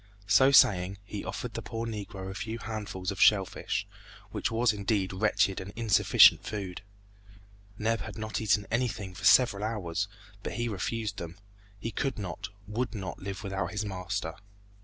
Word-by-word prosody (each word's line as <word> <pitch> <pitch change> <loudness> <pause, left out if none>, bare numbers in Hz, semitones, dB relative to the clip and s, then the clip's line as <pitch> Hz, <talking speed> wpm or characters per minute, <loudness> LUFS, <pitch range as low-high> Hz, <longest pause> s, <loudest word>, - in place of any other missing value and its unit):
So 110 +6 +6
saying, 95 -8 +5
he 100 -1 -6
offered 100 +5 -5
the - - -4
poor 115 0 -4
Negro 100 -4 -5
a - - -6
few 110 +3 -4
handfuls 105 -4 -4
of 95 - -5
shell 100 -3 +6
fish, - - -3 0.5
which - - -1
was 115 0 +2
indeed 100 -2 0
wretched 95 -1 +2
and 95 +2 -8
insufficient 115 -3 +6
food. 100 -4 -5 1.0
Neb 110 +1 0
had - - -7
not 110 0 -3
eaten 105 -1 +2
anything 115 -5 -1
for - - -7
several 115 -6 +5
hours, 100 -4 -2 0.3
but - - -4
he 120 0 -1
refused 110 +1 -3
them. 85 +1 -7 0.4
He 115 +3 -4
could 135 +2 -2
not, 95 -6 -5 0.2
would 120 +3 -2
not 95 -3 -5
live 100 +2 -6
without 95 -1 -2
his 105 0 -3
master. 90 -4 -3
105 Hz, 165 wpm, -29 LUFS, 95-115 Hz, 1.0 s, So